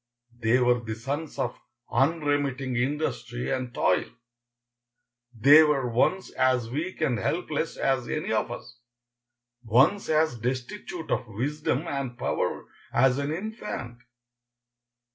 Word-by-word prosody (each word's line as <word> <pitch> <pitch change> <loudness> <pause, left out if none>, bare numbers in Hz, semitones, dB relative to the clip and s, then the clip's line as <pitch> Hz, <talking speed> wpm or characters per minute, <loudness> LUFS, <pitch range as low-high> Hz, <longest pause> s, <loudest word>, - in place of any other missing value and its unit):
They 115 +1 +3
were 125 -1 +3
the 110 -2 -5
sons 140 +7 -4
of 120 - -1 0.4
unremitting 140 -2 +1
industry 125 -2 -2
and 130 -2 -2
toil. - - +1 1.2
They 140 +7 +7
were 150 -5 +2
once 185 +11 +1
as 125 -3 +1
weak 165 +7 -4
and 125 -8 +1
helpless 160 - -2
as 130 -3 0
any - - -2
of - - +1
us, 120 - -9 0.8
once 130 - +3
as 155 -5 +2
destitute 130 - -4
of - - 0
wisdom 140 +6 -2
and 135 -5 -3
power - - -1 0.3
as 130 +2 +3
an 140 +1 -1
infant. 165 - -5
135 Hz, 120 wpm, -27 LUFS, 120-155 Hz, 1.2 s, They